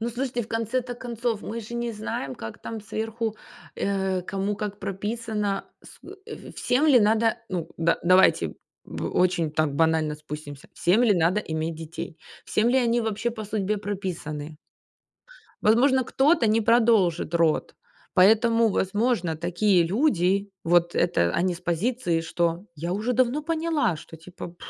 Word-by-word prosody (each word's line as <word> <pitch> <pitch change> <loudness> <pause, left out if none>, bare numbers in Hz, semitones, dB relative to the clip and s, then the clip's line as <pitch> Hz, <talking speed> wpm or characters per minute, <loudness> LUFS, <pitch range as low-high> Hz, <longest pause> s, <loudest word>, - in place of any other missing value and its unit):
Ну, 230 - -1
слушайте, 245 0 -2
в 215 - -11
конце-то 240 +2 -2
концов, 235 -3 -3
мы 230 +2 -5
же 225 +2 -9
не 235 -1 -2
знаем, 210 -10 -4
как 110 -2 -8
там 225 -1 -6
сверху, 220 +1 -4 0.4
э, 190 -2 -1
кому 195 +2 -2
как 205 0 -5
прописано, 210 0 -3 0.2
с - - -15
э, - - -8
э, - - -9
всем 270 +5 +1
ли 260 -6 +6
надо? 220 +1 +2
Ну 175 -4 -3
да, 165 0 +1
давайте, 185 +2 +4 0.3
м, - - -5
очень 175 -4 +2
там 155 -1 0
банально 160 -1 +2
спустимся. 150 -2 -9
Всем 200 +8 +2
ли 230 - +5
надо 175 +5 +2
иметь 160 -3 -3
детей, 165 +1 -7 0.3
всем 220 +2 +1
ли 260 +2 +3
они 240 -1 +2
вообще 225 +1 -1
по 220 -2 -7
судьбе 210 0 -1
прописаны? 170 -7 -5 1.1
Возможно, 260 +4 +4
кто-то 270 +1 +3
не 220 +1 +3
продолжит 220 -8 +3
род, 165 -2 +1 0.4
поэтому, 225 +4 +5
возможно, 195 -4 0
такие 175 +3 +2
люди, 200 - +1
вот 170 0 +3
это 85 0 +2
они 180 +1 +1
с 170 - -11
позиции, 175 0 0
что 170 +3 -1
я 170 +4 -3
уже 215 +6 -1
давно 255 +4 +1
поняла, 315 - 0
что, 160 +1 -12
типа, 170 +1 -10
205 Hz, 155 wpm, -25 LUFS, 170-230 Hz, 1.1 s, ли